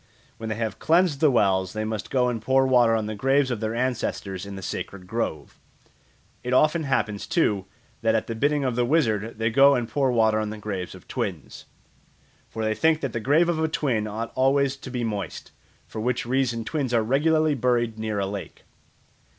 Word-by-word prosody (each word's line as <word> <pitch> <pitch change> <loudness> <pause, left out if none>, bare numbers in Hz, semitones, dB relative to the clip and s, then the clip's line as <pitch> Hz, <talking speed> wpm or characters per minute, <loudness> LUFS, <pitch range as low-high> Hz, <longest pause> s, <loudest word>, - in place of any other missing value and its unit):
When 110 -1 -6
they 110 - -2
have 110 0 -3
cleansed 165 -3 +3
the 155 - +5
wells, 95 -6 +2
they 110 0 -2
must 110 -2 -4
go 125 -2 +2
and 120 -3 -2
pour 130 +3 +3
water 120 -3 +4
on 110 -1 -1
the 110 - -4
graves 135 +5 +2
of 120 - -2
their 110 +1 -2
ancestors 110 -6 -2
in 100 - -7
the 95 - -8
sacred 95 0 -5
grove. 90 -8 -4 0.8
It 125 +1 -2
often 155 +4 +3
happens, 110 -6 -1
too, 105 - +1 0.4
that - - +2
at - - 0
the 115 - -4
bidding 145 +5 +1
of 130 -3 -1
the 125 - +2
wizard 115 -6 +1
they 110 +1 0
go 140 +3 +6
and 120 -2 -1
pour 135 +1 +1
water 110 -2 +3
on 110 -1 -2
the 110 - -6
graves 100 -4 -5
of - - -15
twins. - - -5 0.8
For 110 - -4
they 110 0 +1
think 160 +8 +2
that 135 -4 -3
the 115 - -1
grave 150 +9 +3
of 170 -2 0
a - - +2
twin 125 -9 -1
ought 110 +2 -4
always 135 +1 +2
to 135 - -9
be 125 -1 -3
moist, 105 -4 -4 0.3
for 110 - -7
which 125 +1 -1
reason 120 -2 0
twins 135 -5 -1
are 115 - +3
regularly 155 +5 +2
buried 120 -4 0
near 110 -1 -2
a 100 - 0
lake. 100 0 -7
120 Hz, 205 wpm, -25 LUFS, 110-135 Hz, 0.8 s, go